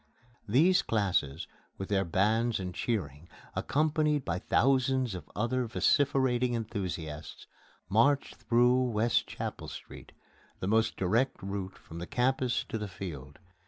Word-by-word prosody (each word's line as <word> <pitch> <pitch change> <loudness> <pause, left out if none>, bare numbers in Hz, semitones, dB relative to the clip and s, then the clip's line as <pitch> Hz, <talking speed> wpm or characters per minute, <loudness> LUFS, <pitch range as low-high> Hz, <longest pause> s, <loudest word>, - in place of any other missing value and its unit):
These 160 - +4
classes, 95 -10 0 0.3
with 95 - -6
their 100 -2 +2
bands 110 +6 +1
and 90 -1 -4
cheering, 85 - -3 0.3
accompanied 150 -1 +1
by 90 0 -1
thousands 130 +1 +2
of 90 -5 -8
other 120 +4 0
vociferating 125 +4 +2
enthusiasts, 90 -9 -5 0.4
march 125 - +3
through 125 +1 +3
West 115 +1 +1
Chapel - - -5
Street - - -10 0.5
the - - -3
most 110 +2 +2
direct 110 +6 +1
route 95 -1 -4
from 80 - -10
the 85 - -6
Campus 125 0 +1
to 110 - -3
the 105 - -4
Field. 80 -7 -8
110 Hz, 125 wpm, -30 LUFS, 95-125 Hz, 0.5 s, These